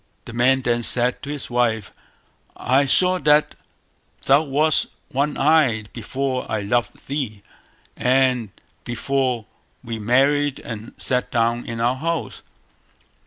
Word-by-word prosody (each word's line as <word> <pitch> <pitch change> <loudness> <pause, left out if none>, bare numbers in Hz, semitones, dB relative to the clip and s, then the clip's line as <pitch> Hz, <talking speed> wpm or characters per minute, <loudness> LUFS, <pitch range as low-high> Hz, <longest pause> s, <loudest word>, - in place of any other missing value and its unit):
The - - -9
man 130 +2 +2
then 120 -1 +1
said 125 +1 +2
to 145 - -7
his 145 -2 -5
wife 115 -4 0 0.6
"I 135 +2 +2
saw 185 +6 +4
that 150 -1 +3 0.7
thou 140 +2 +5
wast 150 +1 +2 0.2
one 140 +3 -1
eyed 135 -8 +2
before 130 +3 -3
I 110 - -1
loved 120 +4 -2
thee, 125 -8 -4 0.5
and 125 -3 +2 0.3
before 125 -1 -1 0.4
we 115 -2 -5
married 135 +5 +2
and 110 0 -8
sat 125 -1 0
down 120 0 0
in 115 -1 -5
our 120 +3 +1
house". 165 +3 -3
125 Hz, 125 wpm, -21 LUFS, 120-140 Hz, 0.7 s, thou